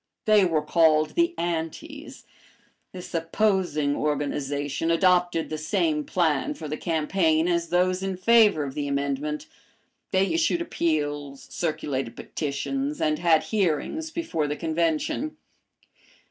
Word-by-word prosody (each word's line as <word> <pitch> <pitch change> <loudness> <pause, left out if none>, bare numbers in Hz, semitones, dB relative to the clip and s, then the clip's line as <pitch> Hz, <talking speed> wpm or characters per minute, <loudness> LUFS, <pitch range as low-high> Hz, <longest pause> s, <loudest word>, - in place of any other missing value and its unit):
They 215 -3 +5
were 160 -4 +1
called 155 -1 +3
the 340 0 +1
"Antis." 175 - -5 0.7
This 180 -1 -9
opposing 165 -4 +1
organization 145 +1 -2
adopted 175 -1 +2
the 155 - -3
same 155 -2 0
plan 160 -6 0
for 155 - -7
the 150 - -3
campaign 160 0 +1
as 170 -1 0
those 180 +1 +1
in 190 -1 -3
favor 210 -5 +5
of 135 -2 -5
the 145 0 -3
amendment. 140 +2 -2 0.6
They 190 +5 +1
issued 335 +1 +2
appeals, 145 - -2
circulated 140 -7 -3
petitions, 270 - -3
and 155 -1 +1
had 165 -2 +4
hearings 210 - 0
before 315 - -2
the 145 - -2
Convention. 165 - -1
165 Hz, 120 wpm, -25 LUFS, 150-190 Hz, 0.7 s, They